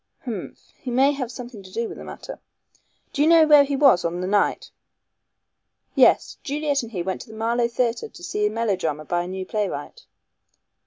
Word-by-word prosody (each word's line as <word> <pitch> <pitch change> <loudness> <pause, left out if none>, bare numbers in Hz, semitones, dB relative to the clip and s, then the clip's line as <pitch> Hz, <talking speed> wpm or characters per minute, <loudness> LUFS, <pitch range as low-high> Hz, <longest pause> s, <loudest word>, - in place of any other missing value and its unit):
Humph! 235 -4 -7
He 270 - -6
may 265 +3 +4
have 260 -4 -4
something 245 -4 -9
to 190 - -13
do 230 +3 -2
with - - -9
the - - -8
matter. - - -9 0.7
Do 285 - -1
you 300 - +4
know 330 -1 +7
where 295 -2 +7
he 280 0 -2
was 270 -10 +5
on 170 +1 -2
that 180 - -2
night?" 200 +2 0 1.2
"Yes. - - +4
Juliet 285 0 -1
and 230 -1 -9
he 180 -6 -3
went 190 +1 -3
to - - -11
the 220 - -10
Marlow 235 +2 +1
Theatre 240 - -1
to - - -14
see 420 0 0
a - - 0
melodrama 185 - -2
by 175 +3 0
a 175 - -5
new 185 0 -5
playwright." 195 -9 -4
235 Hz, 200 wpm, -23 LUFS, 190-280 Hz, 1.2 s, know